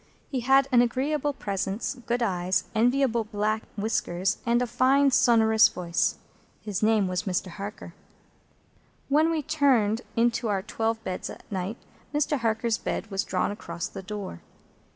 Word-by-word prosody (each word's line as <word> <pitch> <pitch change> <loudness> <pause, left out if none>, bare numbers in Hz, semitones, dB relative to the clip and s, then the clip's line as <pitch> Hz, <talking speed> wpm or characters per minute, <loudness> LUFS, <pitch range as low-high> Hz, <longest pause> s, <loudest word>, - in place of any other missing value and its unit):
He 265 - -1
had 270 +2 +4
an 245 -1 +6
agreeable 280 +4 0
presence, 200 -4 -3
good 240 0 -2
eyes, 185 -3 0
enviable 240 +1 +2
black 215 +1 -1 0.2
whiskers, 195 -3 -1
and 235 +1 +3
a 250 - +1
fine 265 +4 +3
sonorous 225 -3 +5
voice. 170 -1 -1 0.4
His 210 -3 -4
name 215 -2 +3
was 185 +3 -2
Mr. 185 +1 -1
Harker. 200 +4 -8 1.2
When 305 +3 +4
we 320 -2 -1
turned 260 -8 +2
into 235 0 +1
our 195 -3 0
twelve 225 +1 -2
beds 185 -2 -4
at - - -10
night, 190 +3 -3 0.4
Mr. 295 -1 +1
Harker's 225 0 0
bed 225 - -4
was 195 0 0
drawn 185 +2 -1
across 170 -5 -5
the - - -8
door. 200 - -6
225 Hz, 150 wpm, -26 LUFS, 200-250 Hz, 1.2 s, an